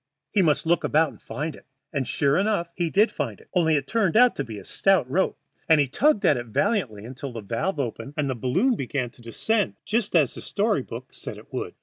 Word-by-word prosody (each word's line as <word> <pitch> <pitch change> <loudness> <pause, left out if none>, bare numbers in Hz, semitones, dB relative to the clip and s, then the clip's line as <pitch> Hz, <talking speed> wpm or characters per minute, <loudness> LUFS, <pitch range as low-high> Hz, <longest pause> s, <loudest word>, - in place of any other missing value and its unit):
He 205 - +3
must 155 -3 +2
look 170 0 +2
about 160 +1 +3
and - - -16
find 155 +1 -4
it. - - -17 0.3
And 140 -3 -1
sure 140 0 +2
enough 195 -4 0
he 170 -1 -1
did 210 +6 +3
find 120 -9 -4
it, - - -20
only 165 -4 +3
it 140 -2 0
turned 215 +1 +1
out 250 0 +6
to 140 - -1
be 110 -5 -8
a - - -9
stout 195 -9 +2
rope, 185 +9 0 0.3
and 160 -2 +6
he 145 - +3
tugged 265 - +2
at 145 - +5
it 120 0 -5
valiantly 130 - 0
until 130 +2 -7
the 115 -2 -6
valve 115 - -2
opened 135 +2 -4
and 150 -2 0
the 130 - 0
balloon 170 - +1
began 125 - -3
to 120 - -19
descend, 205 - 0
just 215 -3 0
as 150 -7 +4
the - - -8
story 205 -6 0
book 125 +1 -9
said - - -7
it - - -15
would. - - -4
150 Hz, 240 wpm, -25 LUFS, 130-195 Hz, 0.3 s, out